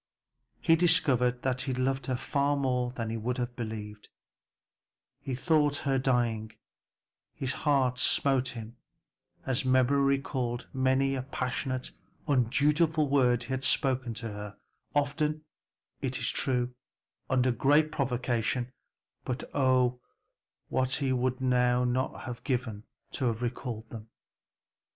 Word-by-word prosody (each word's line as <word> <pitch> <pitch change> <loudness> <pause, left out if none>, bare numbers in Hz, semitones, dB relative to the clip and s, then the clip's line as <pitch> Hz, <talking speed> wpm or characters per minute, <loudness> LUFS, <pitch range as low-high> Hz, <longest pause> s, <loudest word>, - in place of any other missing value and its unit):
He 165 - +5
discovered 130 -8 +3
that 130 -1 0
he 130 -1 -2
loved 130 0 -1
her 130 - 0
far 140 +2 0
more 125 -2 0
than 115 -3 -4
he 115 - -2
would 120 +3 -2
have 120 -1 -3
believed; 105 -3 -6 1.1
he 130 - -4
thought 150 0 +2
her 135 -1 +2
dying, 120 -4 0
and - - -33 0.8
his 130 0 -2
heart 130 -4 +1
smote 135 -2 +3
him, 115 -2 -7 0.7
as 130 -2 0
memory 130 +2 +3 0.2
recalled 125 -3 -3
many 130 +1 +2
a 135 - -1
passionate, 130 0 -3 0.4
undutiful 150 +4 +2
word 125 -3 +3
he 120 - -12
had 130 0 -2
spoken 130 -3 +2
to 115 +1 -4
her; 105 0 -8 0.4
often, 150 +2 0 0.6
it - - -1
is - - 0
true, 125 -1 0 0.6
under 130 -1 +3
great 145 +6 +3
provocation, 125 -2 -1 0.5
but 125 +2 -3
oh, 130 -2 +2 0.7
what 130 - +1
would 130 -2 0
he 130 - -4
not 125 0 +3
now 125 +2 -1
have 120 -2 -7
given 120 -6 -2 0.3
to 125 -3 0
recall 120 -1 -4
them. 110 -1 -9
130 Hz, 130 wpm, -29 LUFS, 120-135 Hz, 1.1 s, He